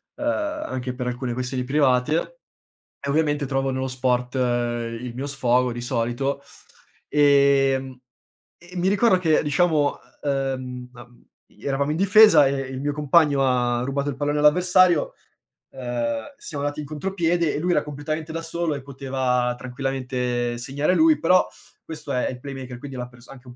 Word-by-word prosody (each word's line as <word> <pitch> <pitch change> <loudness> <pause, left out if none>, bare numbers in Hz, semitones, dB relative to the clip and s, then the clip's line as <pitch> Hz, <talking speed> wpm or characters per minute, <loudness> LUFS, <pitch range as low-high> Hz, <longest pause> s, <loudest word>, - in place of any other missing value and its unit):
anche 295 - -3
per 125 -1 -4
alcune 125 0 -3
questioni 125 +1 -3
private 145 - +1 0.6
e 140 - -5
ovviamente 145 -1 +1
trovavo 135 0 -1
nello 130 0 -2
sport 125 0 -1
il 120 -1 -2
mio 135 - -4
sfogo, 125 -2 +1
di 120 - -5
solito. 120 +3 -2 0.7
Ehm, 140 -2 +3 0.6
e 175 +1 -14
mi 180 +2 +1
ricordo 200 -1 +4
che, 160 -4 +2
diciamo, 150 0 +1 0.2
ehm, 130 -3 -3
uhm 120 0 -16 0.2
eravamo 140 +1 -3
in - - -2
difesa 195 -5 +7
e - - -1
il 130 -1 -6
mio 145 +1 -1
compagno 150 -1 +3
ha 120 -2 +1
rubato 140 +2 -2
il 140 - -3
pallone 145 +1 -1
all'avversario, 180 +2 +4 0.6
ehm, 120 -3 -3
siamo 145 - -6
andati 145 +1 -2
in - - -7
contropiede 170 +1 -1
e - - -1
lui 175 +3 0
era 150 - +3
completamente 155 +2 -5
da 165 - -3
solo 165 -2 -2
e 140 - -6
poteva 130 -2 -1
tranquillamente 125 -2 -3
segnare 140 +7 0
lui, 315 - +5
però 180 +2 +4 0.4
questo 155 -3 -7
è 125 - 0
è - - -2
il 125 - -9
playmaker, 130 -2 -7
quindi 135 +1 -9
è - - -6
la 125 - -4
pers 125 0 -18
anche 130 -2 -13
un 120 - -12
135 Hz, 160 wpm, -23 LUFS, 125-150 Hz, 0.7 s, difesa